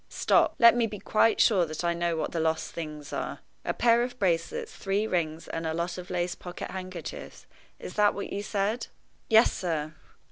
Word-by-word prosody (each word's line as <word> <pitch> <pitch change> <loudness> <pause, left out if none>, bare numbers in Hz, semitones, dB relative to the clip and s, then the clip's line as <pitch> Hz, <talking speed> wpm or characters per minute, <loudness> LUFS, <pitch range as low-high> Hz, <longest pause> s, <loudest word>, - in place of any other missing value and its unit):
Stop! - - +3
let 235 0 +7
me 235 -1 +2
be 210 - -7
quite 215 +3 +2
sure 195 -6 +5
that 155 +2 -5
I 170 0 +2
know 170 0 -1
what - - -2
the 170 - -2
lost 160 0 0
things 150 -3 -7
are. - - -4 0.2
A - - -1
pair 235 0 +3
of 245 +1 -3
bracelets, 170 -4 -1
three 200 +2 -1
rings, 165 -5 -2
and 165 0 -3
a 160 - -2
lot 170 +2 -2
of 180 - -9
lace 175 0 -1
pocket 175 -1 -7
handkerchiefs 185 -3 -7 0.3
is - - -8
that 210 -1 +3
what 200 - -5
you 200 - -2
said?" 205 +3 -1 0.4
"Yes, 225 0 +6
sir." 155 -4 -2
180 Hz, 200 wpm, -28 LUFS, 165-210 Hz, 0.4 s, let